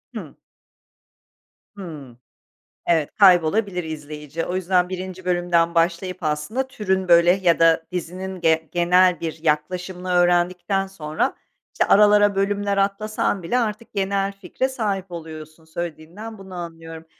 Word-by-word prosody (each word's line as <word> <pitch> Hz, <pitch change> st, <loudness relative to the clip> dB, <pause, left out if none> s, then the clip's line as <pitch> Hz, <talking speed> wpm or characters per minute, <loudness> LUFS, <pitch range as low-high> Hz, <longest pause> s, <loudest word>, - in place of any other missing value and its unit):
Hıı. -, -, -8 dB, 1.4 s
Hıı. 150 Hz, -10 st, -9 dB, 0.7 s
Evet, 160 Hz, -4 st, +2 dB
kaybolabilir 185 Hz, 0 st, +4 dB
izleyici. 150 Hz, 0 st, -6 dB
O 180 Hz, -, -3 dB
yüzden 180 Hz, -1 st, +1 dB
1'inci 185 Hz, 0 st, -6 dB
bölümden 175 Hz, -1 st, +1 dB
başlayıp 170 Hz, +2 st, 0 dB
aslında 155 Hz, +13 st, -2 dB
türün, 190 Hz, -7 st, -1 dB
böyle, 170 Hz, 0 st, +6 dB
yada 165 Hz, -3 st, +3 dB
dizinin 180 Hz, +1 st, -5 dB
gen 160 Hz, -1 st, +2 dB
genel 180 Hz, +1 st, +3 dB
bir 160 Hz, -1 st, -5 dB
yaklaşımını 180 Hz, +4 st, -2 dB
öğrendikten 180 Hz, +2 st, +2 dB
sonra, 155 Hz, -5 st, -2 dB, 0.4 s
işte, -, -, +1 dB
aralara 205 Hz, 0 st, +5 dB
bölümler 200 Hz, 0 st, 0 dB
atlasan 200 Hz, -1 st, -1 dB
bile 235 Hz, +9 st, 0 dB
artık 220 Hz, -1 st, -3 dB
genel 195 Hz, 0 st, -1 dB
fikre 195 Hz, +7 st, -3 dB
sahip 200 Hz, -7 st, -3 dB
oluyorsun, 160 Hz, -1 st, -9 dB
söylediğinden 170 Hz, +7 st, -7 dB
bunu 190 Hz, -1 st, -12 dB
anlıyorum. 165 Hz, -2 st, -8 dB
180 Hz, 120 wpm, -22 LUFS, 165-195 Hz, 1.4 s, böyle